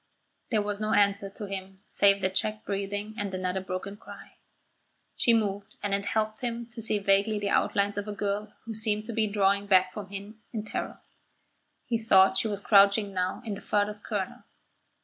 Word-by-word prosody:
There 215 -3 +2
was 205 0 -3
no 215 - 0
answer 200 -1 +3
to 205 +2 -8
him 195 0 -7
save 200 0 +4
the 185 - +2
checked 215 +3 -1
breathing 205 +2 -3
and 200 -1 -2
another 185 0 -2
broken 190 +2 -5
cry. - - -13 0.8
She 235 - +4
moved, 205 -2 0
and 205 -1 -1
it 200 0 0
helped 215 +1 -1
him 235 -1 -3
to 230 - -8
see 215 -1 +1
vaguely 200 +2 +2
the 205 -1 -1
outlines 200 0 +1
of 205 - -5
a - - -3
girl 205 +1 -2
who 230 - -5
seemed 215 -1 -1
to 230 - -5
be 220 -1 +1
drawing 200 0 +2
back 185 -2 +4
from 205 -1 -6
him 200 +2 -9
in 220 -2 -4
terror. - - -5 0.8
He 230 -2 0
thought 190 -4 +5
she 225 - +2
was 205 -2 -2
crouching 200 0 +5
now 185 +4 -2
in 215 - -3
the 200 - -7
farthest 210 0 -1
corner. 200 -4 -4
205 Hz, 190 wpm, -28 LUFS, 195-215 Hz, 0.8 s, thought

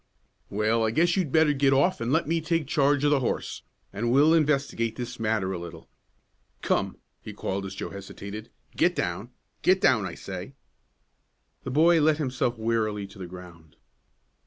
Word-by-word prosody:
"Well, 110 +3 +1
I 110 - +2
guess 170 +9 +2
you'd 180 -8 0
better 155 -1 +4
get 135 -1 +3
off 140 +5 +2
and 115 +2 -1
let 160 0 +2
me 165 +1 0
take 165 0 0
charge 145 0 +2
of 145 - +3
the 145 - +4
horse, 125 - -3 0.3
and 115 +4 -1
we'll 145 +5 +5
investigate 140 -7 +1
this 120 0 -6
matter 110 -4 0
a 90 - -4
little. 85 -1 -10 0.8
Come," - - 0 0.2
he - - -8
called, 95 0 -3
as 95 - -8
Joe - - -5
hesitated, 100 +2 -8 0.3
"get - - +2
down! - - -3 0.3
Get 185 +1 +4
down, 110 - +3
I 85 - -7
say!" 95 +7 -8 1.1
The - - -3
boy 160 +5 +4
let 155 0 +3
himself 130 -5 -1
wearily 110 -2 -1
to 100 0 -14
the 90 - -6
ground. 85 -3 -13
120 Hz, 175 wpm, -26 LUFS, 100-150 Hz, 1.1 s, we'll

